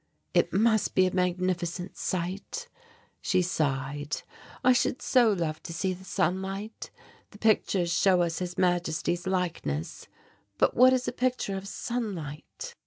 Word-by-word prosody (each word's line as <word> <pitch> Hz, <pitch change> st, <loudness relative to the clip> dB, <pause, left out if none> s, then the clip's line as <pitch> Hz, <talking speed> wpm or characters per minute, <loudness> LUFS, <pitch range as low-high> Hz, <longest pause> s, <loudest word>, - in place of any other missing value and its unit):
"It -, -, +3 dB
must 220 Hz, +1 st, +2 dB
be 185 Hz, -, +5 dB
a 185 Hz, -, -1 dB
magnificent 180 Hz, 0 st, -1 dB
sight," 190 Hz, -, -3 dB, 0.5 s
she 185 Hz, -1 st, +2 dB
sighed. 145 Hz, -3 st, -2 dB, 0.4 s
"I 255 Hz, 0 st, +6 dB
should 250 Hz, +1 st, +1 dB
so 240 Hz, -4 st, +4 dB
love 165 Hz, -5 st, -2 dB
to 170 Hz, -, -7 dB
see 185 Hz, +3 st, -1 dB
the 185 Hz, +1 st, -11 dB
sunlight. 190 Hz, +5 st, -2 dB, 0.4 s
The 205 Hz, -, -14 dB
pictures 200 Hz, -5 st, +2 dB
show 180 Hz, +1 st, +4 dB
us 165 Hz, -1 st, -2 dB
His 180 Hz, -1 st, -4 dB
Majesty's 175 Hz, 0 st, 0 dB
likeness, 170 Hz, -, -2 dB, 0.5 s
but -, -, +3 dB
what 255 Hz, +2 st, +7 dB
is 255 Hz, -1 st, +1 dB
a -, -, +1 dB
picture 250 Hz, -5 st, -1 dB
of 190 Hz, +1 st, -5 dB
sunlight?" 195 Hz, -12 st, -5 dB
185 Hz, 140 wpm, -28 LUFS, 170-205 Hz, 0.5 s, what